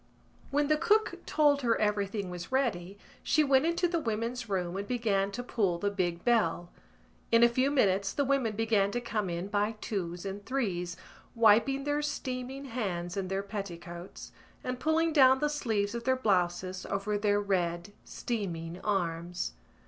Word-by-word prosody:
When 290 +1 +1
the 305 0 +3
cook 430 -1 +2
told 290 -2 +3
her 235 -3 +2
everything 205 -2 -1
was 175 +3 -7
ready 200 -8 -1 0.2
she 310 - +3
went 275 +1 +4
into 340 +1 +2
the 340 -1 0
women's 230 -2 -3
room 180 -2 -1
and 200 +1 -4
began 210 -5 +1
to 245 - -4
pull 200 -8 0
the 200 +3 -1
big 175 -3 -2
bell. 175 -7 +1 0.6
In 230 0 +6
a - - +9
few 255 +3 +1
minutes 200 -8 +2
the 285 - 0
women 260 -6 +1
began 215 -2 +2
to 240 - 0
come 215 -5 -2
in 170 +1 -3
by 205 +2 0
twos 180 -4 -4
and 200 +1 -5
threes, 180 -9 -2 0.4
wiping 230 +5 +4
their 290 +1 0
steaming 265 -2 -4
hands 185 -9 -3
in 195 -2 -2
their 195 +1 -2
petticoats 175 -3 -7 0.3
and 250 0 -3
pulling 320 +2 +2
down 265 -3 +7
the 295 +2 0
sleeves 220 -8 -1
of 235 0 -4
their 260 +2 +2
blouses 185 -4 0
over 200 +1 -1
their 205 0 +2
red 180 -2 -1
steaming 175 -7 -4
arms. 175 - -2
210 Hz, 165 wpm, -30 LUFS, 185-260 Hz, 0.6 s, a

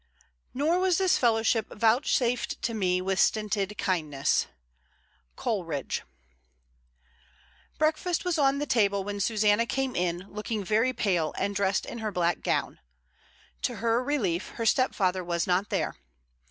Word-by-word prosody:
Nor 315 +7 +2
was 370 -2 +2
this 375 -2 +3
fellowship 225 -2 +2
vouchsafed 235 +2 +1
to 235 - -1
me 180 -4 +1
With 190 0 -1
stinted 210 -2 +1
kindness. 155 -7 0 0.9
Coleridge. 165 - -2 1.8
Breakfast 315 +4 0
was 350 -3 0
on 275 -1 +3
the 295 - -1
table 200 -6 +2
when 205 +1 -4
Susanna 210 +2 +2
came 270 0 -1
in, 175 +1 -1
looking 210 0 -3
very 220 +6 +2
pale, 180 -10 0
and 200 - -1
dressed 195 0 +1
in 235 - -7
her 215 -1 -3
black 175 -2 0
gown. - - -1 0.8
To - - -1
her 230 +2 +1
relief 210 - -1
her 230 - -3
stepfather 190 -7 +2
was 170 -1 -1
not 185 +3 +1
there. - - -1
210 Hz, 135 wpm, -27 LUFS, 185-250 Hz, 1.8 s, this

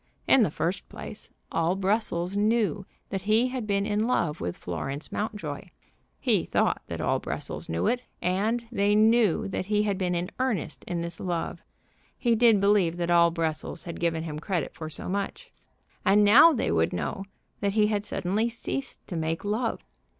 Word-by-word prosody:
In 265 - +6
the 210 - +3
first 170 +5 -3
place, - - -8 0.2
all 165 +2 +1
Brussels 195 -2 0
knew 210 -2 +1 0.2
that 195 - -2
he 220 +6 +3
had 250 -4 -4
been 200 -1 +1
in 215 +1 0
love 170 -11 0
with 85 0 -3
Florence 135 - -5
Mountjoy. 205 -9 -4 0.5
He - - +2
thought - - +1
that - - -5
all - - +1
Brussels - - -5
knew 80 +1 -1
it. 245 +1 +1 0.2
And 215 +6 0
they 205 -2 +2
knew 220 -2 +4
that 185 - -3
he 210 0 +2
had 200 -2 -1
been 180 -2 0
in 175 +1 -2
earnest 255 -9 -2
in 175 -1 -3
this 170 -1 -5
love. 175 -2 -3 0.6
He 240 -2 +2
did 225 -2 +5
believe 195 -4 +3
that 175 0 -1
all 170 0 +6
Brussels 165 0 -3
had 170 - -7
given 165 -1 0
him 150 -2 -5
credit 170 -2 -2
for 160 -1 -7
so 155 - -4
much. 200 - -4 0.5
And 210 +1 +5
now 255 +11 +8
they 260 - 0
would 80 0 +2
know 190 - -3 0.3
that 200 -1 0
he 215 0 +4
had 210 -1 0
suddenly 210 +4 0
ceased 270 +4 -5
to 180 - -5
make 165 +3 -2
love. 220 +3 -1
200 Hz, 180 wpm, -27 LUFS, 170-215 Hz, 0.6 s, now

